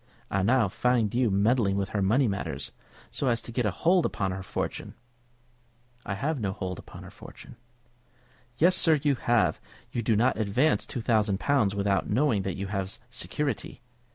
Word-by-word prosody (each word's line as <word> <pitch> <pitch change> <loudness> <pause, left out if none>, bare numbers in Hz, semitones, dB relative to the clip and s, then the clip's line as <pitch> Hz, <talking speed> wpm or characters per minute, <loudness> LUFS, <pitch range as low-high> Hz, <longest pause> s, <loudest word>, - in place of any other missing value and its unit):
I 95 - +1
now 115 +2 +3
find 115 +1 +1
you 120 -1 +2
meddling 100 +1 +2
with 100 0 -1
her 105 - -1
money 115 +8 +3
matters, 100 -2 -3 0.4
so 140 - -1
as 120 -2 +2
to - - -7
get 120 -1 0
a - - +2
hold 175 - +2
upon 95 -1 -1
her 95 +1 -4
fortune." 100 +2 -4 1.1
"I 100 - -2
have 140 +7 -2
no 100 -4 -2
hold 95 -3 -5
upon - - -11
her - - -11
fortune." - - -13 1.0
"Yes, 175 +6 +4
sir, 160 -4 +4
you 145 -2 +3
have. 120 - +1 0.3
You 120 - -2
do 115 -1 +1
not 120 +4 +2
advance 115 +9 +1
two 125 - -4
thousand 105 -4 +1
pounds 120 -8 +2
without 100 -1 0
knowing 115 -2 +2
that 95 -1 -4
you 100 - -3
have 95 -1 -4
security. 135 -4 -4
110 Hz, 180 wpm, -27 LUFS, 100-130 Hz, 1.1 s, Yes